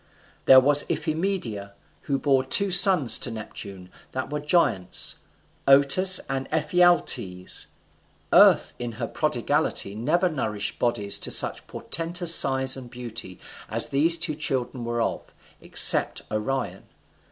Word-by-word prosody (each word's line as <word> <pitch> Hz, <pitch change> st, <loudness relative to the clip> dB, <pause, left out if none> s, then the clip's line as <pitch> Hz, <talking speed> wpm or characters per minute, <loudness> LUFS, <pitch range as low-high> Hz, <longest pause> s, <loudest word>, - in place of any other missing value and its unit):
There 130 Hz, -, +8 dB
was 145 Hz, +2 st, +3 dB
Iphimedia, 155 Hz, -, -4 dB, 0.4 s
who 140 Hz, -, 0 dB
bore 135 Hz, -1 st, 0 dB
two 200 Hz, +8 st, 0 dB
sons 180 Hz, -, +5 dB
to -, -, -3 dB
Neptune 100 Hz, -4 st, -9 dB, 0.2 s
that 130 Hz, +2 st, -5 dB
were 150 Hz, -, -3 dB
giants, 150 Hz, -, -1 dB, 0.5 s
Otus 140 Hz, +8 st, +5 dB
and 135 Hz, 0 st, -4 dB
Ephialtes: 160 Hz, -, 0 dB, 0.7 s
Earth -, -, +4 dB
in 120 Hz, -1 st, -6 dB
her 115 Hz, +1 st, -5 dB
prodigality 145 Hz, -5 st, -2 dB
never 170 Hz, -, -1 dB
nourished 110 Hz, -10 st, -4 dB
bodies 105 Hz, -4 st, 0 dB
to -, -, -3 dB
such -, -, +1 dB
portentous 170 Hz, +1 st, 0 dB
size 130 Hz, -3 st, +3 dB
and 130 Hz, -2 st, -11 dB
beauty 115 Hz, -6 st, -9 dB, 0.3 s
as -, -, 0 dB
these 160 Hz, +5 st, +3 dB
two 165 Hz, -1 st, -1 dB
children 130 Hz, -4 st, -4 dB
were 120 Hz, 0 st, -2 dB
of, -, -, -6 dB, 0.3 s
except -, -, +2 dB
Orion. 125 Hz, +5 st, -4 dB
135 Hz, 125 wpm, -23 LUFS, 115-160 Hz, 0.7 s, There